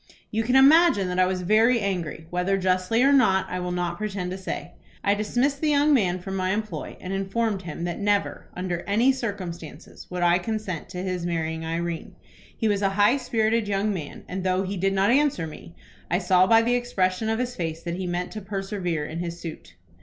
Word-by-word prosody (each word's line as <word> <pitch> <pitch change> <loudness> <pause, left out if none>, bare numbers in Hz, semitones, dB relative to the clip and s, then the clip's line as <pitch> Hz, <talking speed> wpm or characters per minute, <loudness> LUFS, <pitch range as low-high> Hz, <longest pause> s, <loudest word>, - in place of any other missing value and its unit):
"You 220 - 0
can 245 +3 0
imagine 280 - +6
that 180 0 -1
I 185 - +5
was 185 -1 -2
very 225 +6 +4
angry, 180 -6 -3
whether 180 +2 +1
justly 185 +5 +1
or 280 +1 +5
not 190 -8 +4
I 180 - -2
will 180 0 -3
not 175 0 -2
pretend 195 -4 -3
to 185 - -4
say. 190 - -5 0.3
I 200 - +3
dismissed 245 +7 0
the 310 - +2
young 295 +1 +4
man 185 -9 +2
from 190 +2 -6
my 185 0 0
employ, 210 -7 -4
and 185 +1 -5
informed 195 +1 -1
him 170 -2 -6
that 175 -1 -3
never, 205 -1 0
under 180 -1 -3
any 225 +6 +4
circumstances, 195 - -6
would 180 -1 -2
I 175 +1 +4
consent 195 -4 -4
to 180 0 -5
his 185 -2 -2
marrying 160 -2 -2
Irene. 165 0 -4 0.4
He 225 - 0
was 205 -1 +1
a 195 - +3
high 210 +6 +5
spirited 230 -3 0
young 205 +1 0
man, 155 -6 -7
and, 185 0 -4
though 185 0 +1
he 195 +1 -3
did 195 +1 0
not 195 +3 +3
answer 275 - +2
me, 160 +2 -11 0.3
I 175 - +2
saw 185 0 +4
by 225 +1 +6
the 240 +1 +1
expression 220 -4 0
of 225 - +1
his 250 0 -2
face 165 -1 -4
that 170 0 -3
he 185 -1 -3
meant 175 +1 -2
to 215 - -6
persevere 195 -5 -3
in 160 +2 -5
his 170 0 -4
suit. 160 - -9
190 Hz, 215 wpm, -25 LUFS, 180-220 Hz, 0.4 s, imagine